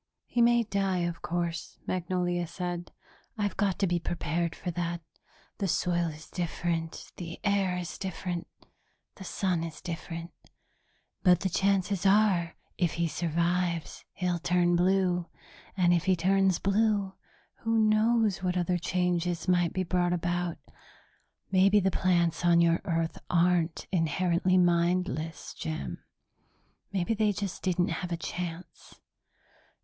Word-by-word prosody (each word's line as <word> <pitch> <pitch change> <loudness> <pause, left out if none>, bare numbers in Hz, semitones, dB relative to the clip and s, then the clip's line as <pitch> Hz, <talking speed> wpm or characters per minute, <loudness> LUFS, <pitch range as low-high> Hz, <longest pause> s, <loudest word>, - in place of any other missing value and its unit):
"He 240 - 0
may 235 0 +5
die, 195 -4 0
of 170 -1 -4
course," 170 +1 -3
Magnolia 175 -1 -1
said. 175 0 -5 0.5
"I've 205 -1 -1
got 200 -3 +1
to 200 - +2
be 175 -1 +1
prepared 170 0 -2
for 180 - -4
that. 170 0 -3 0.6
The 195 - 0
soil 175 -1 +1
is 155 0 -8
different, 170 -1 -3
the 170 -2 -7
air 195 -3 +1
is 175 -1 -5
different, 180 -2 -4 0.7
the 190 - -8
sun 185 -3 -1
is 165 -1 -6
different. 170 -1 -6 0.9
But 180 -3 +5
the 190 - 0
chances 195 0 +1
are, 195 -4 +3 0.2
if 175 -3 +1
he 170 0 0
survives, 170 0 -1
he'll 180 -1 -1
turn 175 +1 +2
blue. 180 -1 +2 0.5
And 175 -1 +4
if 170 -1 +1
he 190 -1 +4
turns 190 +1 +3
blue, 200 -1 +1 0.5
who 225 0 0
knows 215 -1 +3
what 180 -1 0
other 175 0 +1
changes 180 0 0
might 175 -2 +3
be 185 - -1
brought 175 0 +1
about? 175 0 -1 0.9
Maybe 195 +2 +5
the 190 -1 +1
plants 175 -2 +1
on 170 -1 +5
your 170 0 +3
Earth 165 -3 -1
aren't 175 -1 +2
inherently 180 +2 +2
mindless, 170 -3 +1
Jim. 155 0 -5 0.9
Maybe 190 +2 0
they 215 -1 +2
just 200 -1 -4
didn't 180 -1 +1
have 180 -1 -3
a 170 - -1
chance. 170 0 -6
175 Hz, 135 wpm, -29 LUFS, 170-190 Hz, 0.9 s, may